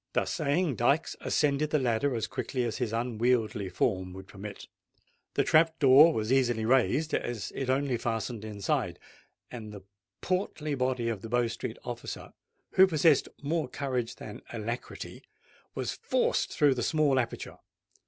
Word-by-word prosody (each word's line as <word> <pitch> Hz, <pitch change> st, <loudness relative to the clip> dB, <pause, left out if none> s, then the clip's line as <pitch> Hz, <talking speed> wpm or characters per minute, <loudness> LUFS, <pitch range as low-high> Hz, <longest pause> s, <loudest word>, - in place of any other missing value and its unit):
Thus -, -, 0 dB
saying, 150 Hz, -1 st, 0 dB
Dykes 140 Hz, +7 st, +2 dB
ascended 150 Hz, 0 st, +1 dB
the 150 Hz, -, +2 dB
ladder 125 Hz, 0 st, +1 dB
as 115 Hz, -, -1 dB
quickly 130 Hz, -3 st, -3 dB
as 115 Hz, -2 st, -2 dB
his 120 Hz, -4 st, -1 dB
unwieldly 115 Hz, -3 st, 0 dB
form 95 Hz, 0 st, -1 dB
would 95 Hz, +1 st, -10 dB
permit. 100 Hz, +1 st, -9 dB, 0.7 s
The -, -, +3 dB
trap 160 Hz, 0 st, +4 dB
door 145 Hz, +3 st, +7 dB
was 110 Hz, -2 st, 0 dB
easily 120 Hz, -4 st, +2 dB
raised, 135 Hz, +6 st, +2 dB
as 120 Hz, -4 st, -2 dB
it 135 Hz, -2 st, -3 dB
only 135 Hz, -1 st, +1 dB
fastened 115 Hz, -1 st, -3 dB
inside; 105 Hz, -3 st, -2 dB, 0.5 s
and 110 Hz, -4 st, -7 dB
the 100 Hz, -2 st, -10 dB, 0.4 s
portly 180 Hz, -5 st, -2 dB
body 130 Hz, -3 st, 0 dB
of 110 Hz, -4 st, -2 dB
the 115 Hz, -, -7 dB
Bow 120 Hz, +1 st, +2 dB
Street 115 Hz, -, -5 dB
officer, -, -, -6 dB, 0.4 s
who 190 Hz, 0 st, +7 dB
possessed 160 Hz, -3 st, +3 dB
more 155 Hz, -1 st, -1 dB
courage 125 Hz, -4 st, -2 dB
than 105 Hz, -, -9 dB
alacrity, 115 Hz, +1 st, -5 dB, 0.5 s
was -, -, -2 dB
forced -, -, 0 dB
through 145 Hz, -2 st, +4 dB
the 125 Hz, -, -3 dB
small 145 Hz, 0 st, +2 dB
aperture. 120 Hz, -2 st, -4 dB
125 Hz, 155 wpm, -29 LUFS, 115-145 Hz, 0.7 s, door